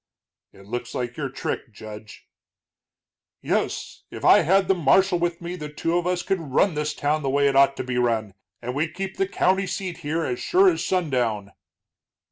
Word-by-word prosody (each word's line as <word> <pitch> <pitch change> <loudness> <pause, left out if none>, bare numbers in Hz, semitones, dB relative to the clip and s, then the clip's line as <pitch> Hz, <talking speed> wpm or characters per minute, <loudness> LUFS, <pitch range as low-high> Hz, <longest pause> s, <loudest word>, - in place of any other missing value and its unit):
"It 100 - -17
looks 120 +3 -5
like 120 -1 -3
your 140 -3 -3
trick, 130 -1 -4
Judge." 105 0 -11 1.1
"Yes, - - -2
if - - -7
I - - +8
had 190 +3 +3
the - - +4
marshal 180 +3 +3
with 170 0 -1
me 175 +1 -5
the 150 -4 -6
two 165 +3 -1
of 175 0 0
us 180 -1 0
could 195 - 0
run 160 +5 +1
this 150 0 -2
town 150 +1 0
the 135 - -1
way 140 +1 +3
it 135 - +1
ought 135 0 +5
to - - -2
be 125 -1 -2
run. 110 -4 0 0.3
And 125 +1 -3
we'd 155 +4 -2
keep 195 0 -5
the 195 - +1
county 190 0 +1
seat 180 -1 -4
here 160 +3 -2
as 125 -1 -2
sure 380 +2 +4
as 340 - -1
sundown." 125 - -1
150 Hz, 195 wpm, -24 LUFS, 125-180 Hz, 1.1 s, I